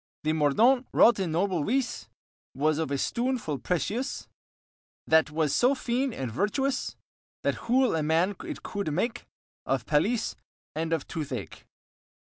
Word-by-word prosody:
The 155 +1 +1
mordaunt 225 - +3
wrought 230 -3 +6
in 185 -4 -1
noble 175 -1 +1
wyse, 250 - -1 0.5
Was 155 +2 +1
of 160 - -1
a 140 - 0
stoon 250 - 0
full 150 - -4
precious, 220 - -2 0.8
That 160 -1 +4
was 155 -1 0
so 255 +3 +4
fyn 255 +1 -1
and 130 - -4
vertuous, 215 - -1 0.5
That - - -2
hool 255 -4 +4
a 160 - 0
man 165 +5 +2
it - - -7
coude 200 -6 -3
make 225 +10 -2 0.4
Of 135 -4 0
palasye 215 +10 +1 0.4
and 160 +1 -2
of 165 - -1
tooth 155 -3 -5
ake. - - -6
180 Hz, 150 wpm, -28 LUFS, 155-240 Hz, 0.8 s, wrought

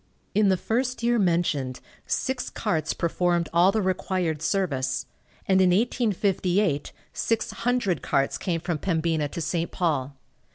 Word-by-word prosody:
In 205 0 +4
the 190 - +3
first 250 +5 -1
year 240 0 +3
mentioned 165 -8 +1 0.3
six 260 -1 -1
carts 160 -8 -1
performed 170 0 0
all 175 +3 +5
the 215 0 0
required 185 -4 -1
service, 140 -8 0 0.4
and 190 -1 +4
in 185 - +5
1858 195 - +1 0.2
six 230 -1 -1
hundred 230 - 0
carts 135 0 0
came 170 -3 -1
from 170 -3 -2
Pembina 160 -3 0
to 170 - -6
St. 165 +1 -1
Paul. 145 -6 -1
180 Hz, 135 wpm, -26 LUFS, 160-200 Hz, 0.4 s, all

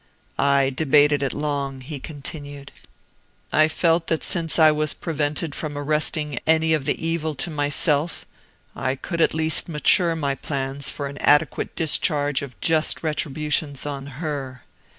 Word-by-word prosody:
"I 140 -1 +3
debated 145 0 +3
it 135 -2 0
long," 140 -3 -3
he 140 +2 -6
continued. 145 0 -8 0.8
"I 155 +1 +5
felt 165 +1 +1
that 160 - 0
since 165 -3 +1
I 155 -2 +7
was 150 0 -1
prevented 150 0 -2
from 145 -1 -5
arresting 150 -1 -1
any 160 0 +3
of 150 -4 0
the 165 - -1
evil 160 -2 -1
to 165 - -3
myself, 145 +2 0 0.5
I 130 +2 -1
could 165 +5 -4
at - - +3
least 160 +1 +1
mature 165 +2 +3
my 140 -4 -1
plans 135 0 -3
for 145 - -5
an 140 +1 -7
adequate 145 0 +2
discharge 145 -3 +1
of 140 -3 -9
just 160 0 +1
retributions 150 -2 -1
on 140 -1 -5
her. 140 -6 -5
150 Hz, 150 wpm, -23 LUFS, 140-160 Hz, 0.8 s, I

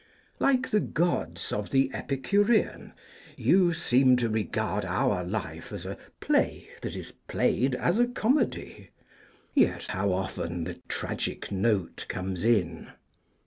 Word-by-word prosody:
Like 260 -1 +2
the 210 - +4
Gods 165 - -1
of 105 -1 -2
the 135 -1 +2
Epicurean, 205 - +1 0.4
you 185 -2 +4
seem 130 -5 +4
to 120 -2 +1
regard 110 -3 -1
our 90 - +1
life 85 -4 -5
as - - -6
a - - -4 0.2
play - - +1
that - - -4
is - - -7 0.2
played, 125 +2 +1
as 175 - +1
a 240 - +5
comedy; 245 +1 -1 0.6
yet - - +2
how 95 +1 -1
often 90 -2 -2
the 90 +1 -6
tragic - - -3
note 100 -2 0
comes 90 0 -3
in! 90 -8 +1
115 Hz, 130 wpm, -28 LUFS, -, 0.6 s, a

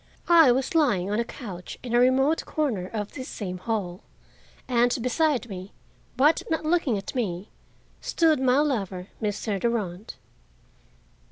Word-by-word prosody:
I 325 -6 +7
was 265 +8 0
lying 210 - +2
on 210 - 0
a - - +2
couch 200 -8 -8
in 240 -2 -5
a 240 - +5
remote 265 +5 +3
corner 240 -13 -1
of 210 0 -5
this 260 -2 -7
same 185 -4 -5
hall 190 -3 -3 0.7
and 245 -1 +2
beside 255 +1 +1
me, 190 -2 -8 0.4
but 295 +5 +4
not 320 -1 -1
looking 310 -9 +1
at 195 - -6
me, 200 -6 -3 0.5
stood 320 -3 +2
my 260 0 +3
lover, 195 -10 -2
Mr. 205 -1 -2
Durand. 210 -4 -2
235 Hz, 145 wpm, -26 LUFS, 195-270 Hz, 0.7 s, I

